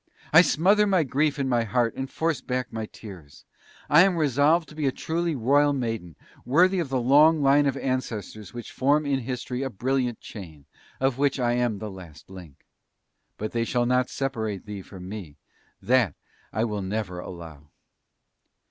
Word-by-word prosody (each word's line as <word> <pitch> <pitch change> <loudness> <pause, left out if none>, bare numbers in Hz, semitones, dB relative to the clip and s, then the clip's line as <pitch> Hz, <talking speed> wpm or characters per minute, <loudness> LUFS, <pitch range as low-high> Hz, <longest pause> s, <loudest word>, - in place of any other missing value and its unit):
I 160 - +10
smother 195 +6 +3
my 185 -4 +3
grief 145 +2 0
in 135 -1 -1
my 120 -2 +2
heart, 115 +1 0
and 135 0 -4
force 160 0 -1
back 125 -1 -3
my 110 -1 -4
tears. 90 -12 -13 0.4
I 150 +3 +6
am 185 -1 +3
resolved 155 +3 +2
to 150 - -13
be 150 -2 -1
a - - +2
truly 165 +3 -2
Royal 145 +4 +3
maiden, 115 - -4 0.3
worthy 180 +9 +3
of 165 -6 -2
the 130 -1 0
long 145 +5 +5
line 140 +1 +4
of 135 - -1
ancestors 110 -6 -4
which 120 -1 -8
form 145 +3 +2
in 140 -2 0
history 125 0 -4
a 135 - -2
brilliant 125 +2 -1
chain, 80 -9 -11 0.3
of 135 -1 0
which 140 -1 +1
I 120 -1 +1
am 120 -3 0
the 105 +1 -6
last 90 -3 -13
link. 90 -7 -13 0.7
But 110 - -4
they 115 -1 0
shall 120 +1 0
not 125 +1 +1
separate 110 -8 -3
thee 105 -2 -7
from 90 -1 -11
me.... 95 -8 -8 0.5
That 120 - +2 0.4
I 110 - -1
will 105 -3 -2
never 95 -2 -3
allow!" 80 -5 -10
125 Hz, 175 wpm, -25 LUFS, 105-145 Hz, 0.7 s, I